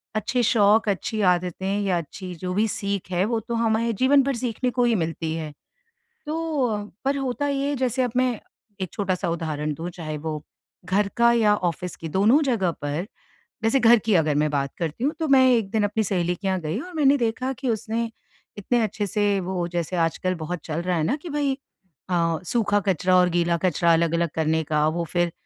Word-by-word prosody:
अच्छे 225 +4 0
शौक, 215 -1 +4
अच्छी 210 +2 -2
आदतें 180 +2 +1
या 190 -3 +1
अच्छी 180 +3 -6
जो 180 +2 -4
भी 215 +3 +2
सीख 200 -2 -3
है, 180 0 +1
वो 225 +1 0
तो 230 +2 -5
हमारे 230 0 +1
जीवन 265 +6 +4
भर 275 -1 -1
सीखने 245 +1 -2
को 245 - +1
ही 235 -2 +3
मिलती 165 -2 -2
है। 155 -2 -5 0.8
तो 295 -9 -1 0.2
पर 280 +1 +1
होता 270 +2 -2
ये 280 0 0
जैसे 260 0 0
अब 245 - -1
मैं 250 -3 +1 0.4
एक 185 - -3
छोटा-सा 185 -4 -1
उदाहरण 155 -3 -2
दूँ, 165 +4 -5
चाहे 155 -3 -6
वो 155 0 -4 0.4
घर 200 +2 +1
का 235 0 +5
या 215 -3 +4
ऑफ़िस 180 -2 -3
की 165 - -7
दोनों 215 - +4
जगह 225 -10 +1
पर 150 +6 -2 0.6
जैसे 225 +5 +3
घर 235 -1 +7
की 215 0 0
अगर 155 -4 +3
मैं 150 - +1
बात 140 -1 -2
करती 170 - -3
हूँ, 295 - +2
तो 315 - 0
मैं 265 -1 +6
1 225 -5 +1
दिन 215 -2 +1
अपनी 215 +2 0
सहेली 180 -2 0
के 195 - -7
यहाँ 185 -1 0
गई 160 +5 -3
और 360 +5 -9
मैंने 285 -3 +4
देखा 245 +2 -1
कि 265 0 -4
उसने 225 +1 -2 0.5
इतने 240 +4 +1
अच्छे 210 -1 -2
से 205 0 +1
वो 180 -1 -2
जैसे 175 0 -3
आजकल 170 +2 0
बहुत 165 +1 -5
चल 160 +1 -3
रहा 180 0 0
है 160 - +1
ना 260 - +1
कि 350 - -7
भाई 285 -2 0 0.5
अ, 165 -2 +1
सूखा 210 -2 +1
कचरा 185 -2 +2
और 180 0 +5
गीला 170 0 +1
कचरा 170 -1 +3
अलग-अलग 170 +1 +2
करने 160 0 +1
का 150 -1 +1
वो 170 +2 -1
फिर 175 -1 +1
200 Hz, 205 wpm, -24 LUFS, 170-235 Hz, 0.8 s, घर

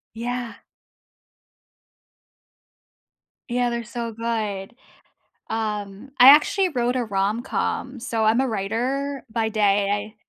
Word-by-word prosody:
Yeah. 240 +1 -4 2.9
Yeah, 245 0 +1
they're 235 0 -3
so 235 0 -5
good. 220 -2 -3 0.7
Um, 210 +1 -4
I 250 +1 +9
actually 365 +6 +4
wrote 245 -3 0
a 250 - 0
rom-com. 220 +5 -2
So, 225 -1 -1
I'm 220 +3 +3
a 265 - +1
writer 250 +7 -2
by 225 0 0
day, 205 -2 +2
I 205 +1 -2
230 Hz, 105 wpm, -23 LUFS, 215-245 Hz, 2.9 s, I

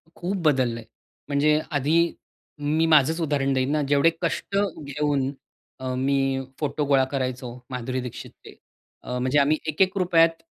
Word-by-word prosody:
खूप 185 +3 -3
बदललंय, 125 -5 +1 0.5
म्हणजे 150 +2 +3
आधी 145 +3 +2 0.8
मी 165 - +3
माझंच 155 +2 +4
उदाहरण 140 -3 0
देईन 130 +1 0
ना, 150 0 +1
जेवढे 145 +3 +5
कष्ट 175 +3 -2 0.3
घेऊन 140 -1 -1 0.5
अ, 130 0 -3
मी 135 0 +1 0.2
फोटो 150 0 -1
गोळा 140 -2 +4
करायचो 130 -2 -3 0.2
माधुरी 125 0 -3
दीक्षितचे, 125 -2 -9 0.5
अ, 125 - -4
म्हणजे 130 +3 +2
आम्ही 145 +2 +3
₹1-1 170 -1 +2
140 Hz, 130 wpm, -24 LUFS, 130-155 Hz, 0.8 s, जेवढे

